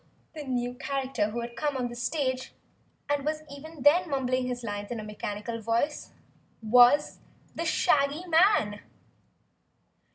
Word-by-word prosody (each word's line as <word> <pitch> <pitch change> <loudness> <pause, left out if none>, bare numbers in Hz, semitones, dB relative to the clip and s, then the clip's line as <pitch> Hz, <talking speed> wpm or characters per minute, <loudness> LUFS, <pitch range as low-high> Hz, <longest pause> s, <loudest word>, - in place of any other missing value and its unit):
The 310 -2 -7
new 245 -2 -2
character 265 -4 -2
who 235 +2 -4
had 235 0 -7
come 285 +3 -1
on 250 -1 -1
the 240 - -8
stage 260 0 -2 0.5
and 290 -1 0
was 310 +1 -2
even 285 +1 -10
then 340 +4 +5
mumbling 255 -2 0
his 245 -1 -4
lines 205 -2 -5
in 240 - -4
a - - -6
mechanical 210 +2 -5
voice 230 +7 -1 0.5
was 245 +6 +5 0.3
the 335 - -4
Shaggy 295 +1 +2
Man! 325 - +3
260 Hz, 140 wpm, -28 LUFS, 235-290 Hz, 0.5 s, then